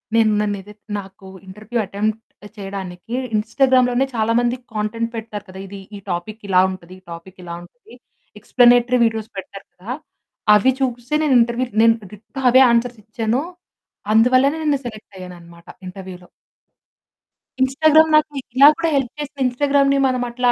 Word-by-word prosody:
నేను 220 -1 +4
నన్నేదైతే 205 0 -5 0.2
నాకు 190 0 -13 0.2
interview 215 +5 -6
attempt 215 +3 -3 0.4
చేయడానికి 195 +1 -7 0.2
ఇన్‌స్టాగ్రామ్ 255 +4 +2
లోనే 250 +2 +1
చాలా 225 +1 +1
మంది 240 +1 0 0.2
కాంటెంట్ 220 +2 -2
పెడతారు 220 -2 -6
కదా! 190 +1 -10
ఇది, 200 +1 -9 0.2
ఈ - - -9
టాపిక్ 205 +6 -5
ఇలా 185 -1 +5
ఉంటది, 185 -1 -11
ఈ - - -29
టాపిక్ 180 +3 -11
ఇలా 170 -1 -7
ఉంటది. 240 +6 -19 0.5
ఎక్స్‌ప్లానేటరీ 245 +1 +4
వీడియోస్ 225 0 -2
పెడతారు 195 +1 -9
కదా! 195 +7 -9 0.6
అవి 260 +6 +4
చూసే 245 +2 -2
నేను 285 -3 +2
ఇంటర్వ్యూలో 235 0 -1
నేను 230 0 +5 0.2
డిట్టో 220 +6 -9
అవే 260 +2 +6
ఆన్సర్స్ 235 -1 0
ఇచ్చాను. 225 +3 -2 0.7
అందువల్లనే 255 +6 +4
నేను 290 -3 +1
సెలెక్ట్ 215 -3 -9
అయ్యాననమాట 170 -2 -12 0.2
ఇంటర్వ్యూలో. 180 -1 -10 1.3
ఇన్‌స్టాగ్రామ్ 310 +4 +4
నాకు 305 0 +1 0.2
ఇలా 280 +2 +8
కూడా 330 0 0
హెల్ప్ 265 -3 -1
చేసింది. 285 -1 -7
ఇన్‌స్టాగ్రామ్‌ని 275 +2 +2
మనం 255 -1 -1
అట్లా 245 0 +1
230 Hz, 145 wpm, -20 LUFS, 195-255 Hz, 1.3 s, ఇలా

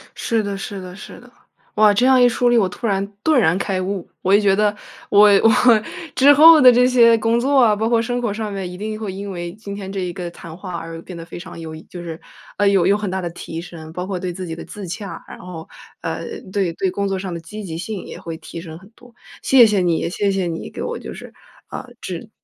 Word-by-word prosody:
是 225 -2 -1
的 200 -1 -3
是 195 0 -6
的 180 0 -9
是 205 - -11
的。 245 0 -17 0.4
哇， 210 0 +5
这 230 +5 +2
样 260 -1 +5
一 245 - +7
梳 245 +1 +2
理， 240 - +4
我 205 -5 +3
突 185 - -7
然 195 -2 0 0.2
顿 310 -4 +4
然 175 -6 +3
开 190 -1 -2
悟。 190 -1 -4
我 190 - +2
也 205 - +7
觉 200 -2 +3
得 210 +1 +2 0.3
我 205 +1 +7
我 225 - +7 0.6
之 280 +3 +6
后 315 +2 +9
的 255 -3 +9
这 250 +1 +4
些 235 -2 +5
工 230 +2 +2
作 275 +3 +1
啊， 220 -2 +5
包 215 +2 -1
括 230 -1 +2
生 245 +1 -2
活 230 -4 -1
上 215 0 -4
面 195 -2 -4
一 180 - -9
定 215 +2 -5
会 210 -4 -4
因 200 +1 -6
为 175 -1 -5
今 205 0 -9
天 200 -1 -7
这 195 0 -4
一 180 -1 -3
个 175 -1 -6
谈 165 -1 -11
话 180 0 -7
而 165 0 -7
变 180 - -10
得 165 - -8
非 170 - -9
常 175 - -10
有 160 -1 -7
益， 155 - -9
就 175 - -8
是， 165 -1 -7 0.4
呃， 205 - +3
有 195 -3 +3
有 200 +2 +4
很 210 -2 -3
大 190 +1 -2
地 175 - -3
提 165 -1 -7
升。 160 -2 -10
包 180 +1 -4
括 190 -1 -4
对 180 -1 -4
自 185 +1 -6
己 165 -2 -5
的 - - -8
自 205 -2 -8
洽， 195 +3 -7
然 - - -10
后， 170 -3 -9 0.4
呃， - - -4 0.3
对 190 -4 0
对 190 +2 -1
工 200 +2 -2
作 195 -1 -1
上 185 -1 -5
的 170 - -5
积 210 +6 -9
极 165 -4 -6
性 195 +2 -5
也 - - -9
会 165 -1 -6
提 165 +1 -9
升 160 -2 -9
很 190 +4 -17
多， 240 +1 -20 0.3
谢 260 -3 +6
谢 210 -2 +2
你 170 -2 0
谢 200 +3 -1
谢 190 -2 -1
你 165 -1 -5
给 - - -6
我 - - -4
就 - - -8
是， - - -11 0.4
呃， - - -6
指 - - -6
195 Hz, 285 characters per minute, -20 LUFS, 175-220 Hz, 0.6 s, 后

